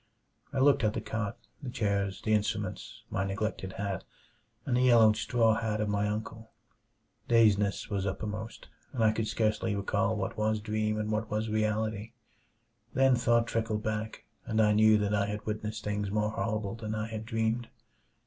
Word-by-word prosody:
I 140 - -4
looked 140 0 +4
at 105 -1 +2
the - - -2
cot, 110 -2 -3 0.2
the 135 - -5
chairs, 100 -4 -1
the 110 - +1
instruments, 105 -1 -2
my 95 - 0
neglected 95 -1 -3
hat, 100 -2 -3 0.6
and 130 - +1
the 125 - +3
yellowed 115 -4 +6
straw 115 0 +2
hat 110 -1 -1
of 105 -1 0
my 105 0 +1
uncle. 110 +1 -5 0.8
Dazedness 105 -4 +3
was 100 -1 -1
uppermost, 105 +3 -5 0.3
and 120 -4 0
I 110 - +5
could 110 0 -2
scarcely 110 -1 0
recall 100 -1 0
what - - -3
was 110 0 +1
dream 110 0 -1
and 105 0 -2
what 110 +1 -1
was 110 +1 -1
reality. 110 0 -1 0.8
Then 135 0 +5
thought 120 -1 +3
trickled 110 -2 -2
back, 110 0 -3 0.2
and 110 -1 -1
I 105 -1 +5
knew 110 0 +6
that 105 0 0
I 100 -1 +2
had 105 0 -5
witnessed 105 0 -4
things 105 -1 -2
more 105 +1 0
horrible 110 -2 -2
than 110 -1 -4
I 110 0 -2
had 110 -1 -5
dreamed. 115 +1 -1
110 Hz, 175 wpm, -30 LUFS, 105-110 Hz, 0.8 s, yellowed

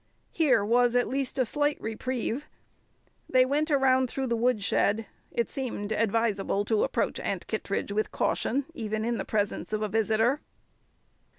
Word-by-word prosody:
Here 255 -11 +3
was 240 +2 +3
at 245 - +3
least 270 0 -2
a 255 - +3
slight 290 +4 0
reprieve. 245 +4 -3 0.8
They 255 -1 +5
went 295 +4 0
around 260 -3 +3
through 265 +2 -2
the 235 -2 0
woodshed; 225 -2 +1 0.2
it 235 - -2
seemed 230 -6 -4
advisable 210 -2 +1
to 215 -1 +2
approach - - -1
Aunt - - -3
Kittredge - - -3
with 215 +1 -1
caution, 270 +3 0
even 220 -6 -3
in 235 0 0
the - - -3
presence 205 0 -2
of 215 0 0
a 215 - -1
visitor. 225 +6 +2
235 Hz, 155 wpm, -28 LUFS, 215-260 Hz, 0.8 s, They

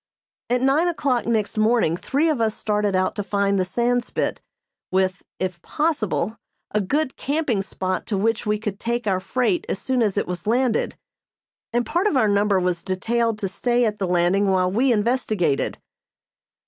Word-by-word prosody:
At 245 0 +2
nine 285 +6 +3
o'clock 275 -9 0
next 220 -2 0
morning 215 -7 +3
three 280 - 0
of 300 -7 +1
us 220 -1 +1
started 210 -2 0
out 185 0 +1
to 205 - -1
find 200 0 +1
the 185 - +1
Sandspit, 240 +5 -1 0.5
with, 185 0 +1 0.2
if 180 -3 -3
possible, 235 - -1 0.3
a 210 - +1
good 265 +8 -1
camping 280 -7 0
spot 185 -1 -3
to 205 - -1
which 225 +3 +1
we 210 0 0
could 210 -2 -5
take 235 0 -2
our 190 -3 +1
freight 255 - 0
as - - -1
soon 260 -2 0
as 210 -3 +1
it - - +1
was 180 +1 -5
landed, 240 +1 +1 0.7
and 240 +1 +1
part 350 +6 +1
of 305 - +2
our 220 - +4
number 205 -1 +3
was 180 -1 0
detailed 225 +5 0
to 200 - -2
stay 240 +5 +1
at 210 -1 -2
the 190 - 0
landing 180 +3 +2
while 185 -1 +2
we 250 +6 +2
investigated. 215 - 0
215 Hz, 175 wpm, -23 LUFS, 190-245 Hz, 0.7 s, our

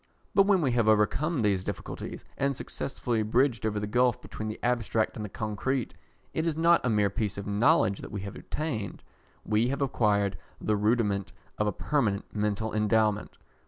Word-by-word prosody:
But 195 -1 +5
when 195 -3 +4
we 130 - +2
have 120 -2 +2
overcome 115 +7 +2
these 100 -3 +2
difficulties, - - -6
and 140 0 0
successfully 120 -3 -2
bridged 115 +1 +2
over 105 -1 -1
the 105 - -2
gulph 125 +3 +2
between 110 - -6
the 110 - -4
abstract 115 -2 +1
and 110 - -5
the 105 - -5
concrete, 110 +5 -2 0.4
it 160 +1 0
is 160 -2 -1
not 170 +1 +4
a 125 - +1
mere 105 -3 +2
piece 105 -1 -2
of 100 - -5
knowledge 105 - +3
that - - -8
we 105 -2 -4
have 100 0 -7
obtained: 115 - -4 0.4
we 110 +2 +2
have 140 +2 -1
acquired 100 -8 +1 0.2
the 105 - +1
rudiment 105 -2 +1 0.3
of 105 - +2
a - - +2
permanent 110 -4 0
mental 105 +1 -1
endowment. 105 0 +1
110 Hz, 180 wpm, -28 LUFS, 105-125 Hz, 0.4 s, But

